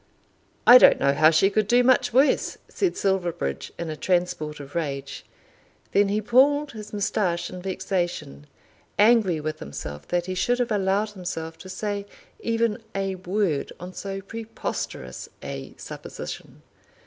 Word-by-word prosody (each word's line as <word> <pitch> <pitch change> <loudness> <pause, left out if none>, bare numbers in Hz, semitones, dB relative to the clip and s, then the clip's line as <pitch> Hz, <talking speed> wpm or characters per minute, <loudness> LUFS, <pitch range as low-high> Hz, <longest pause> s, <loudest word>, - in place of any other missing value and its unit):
"I 245 +1 +11
don't - - +7
know 140 - +3
how 155 +2 +6
she 165 +5 +4
could 215 0 +1
do 245 +3 +5
much 255 0 +4
worse," 265 +5 +3
said 375 -3 -1
Silverbridge 170 - -1
in 170 -2 -4
a - - -4
transport 175 -3 -1
of 140 0 -10
rage. 140 -4 -4 0.7
Then 200 0 +4
he 210 +2 0
pulled 280 +6 +4
his 215 -2 -9
moustache 200 -4 -1
in 180 0 -7
vexation, 175 - -3 0.5
angry 210 -6 +4
with 155 +1 -4
himself 75 +1 -7
that 175 0 0
he 185 - -3
should 215 +7 +1
have 245 -2 -1
allowed 205 +1 +1
himself 165 -4 -5
to 185 - -10
say 205 +1 -3 0.3
even 230 0 0
a 195 -1 -1
word 185 -4 -1
on 180 +1 -8
so 195 0 -5
preposterous 200 - -6
a 70 - -7
supposition. - - -8
190 Hz, 150 wpm, -25 LUFS, 160-215 Hz, 0.7 s, I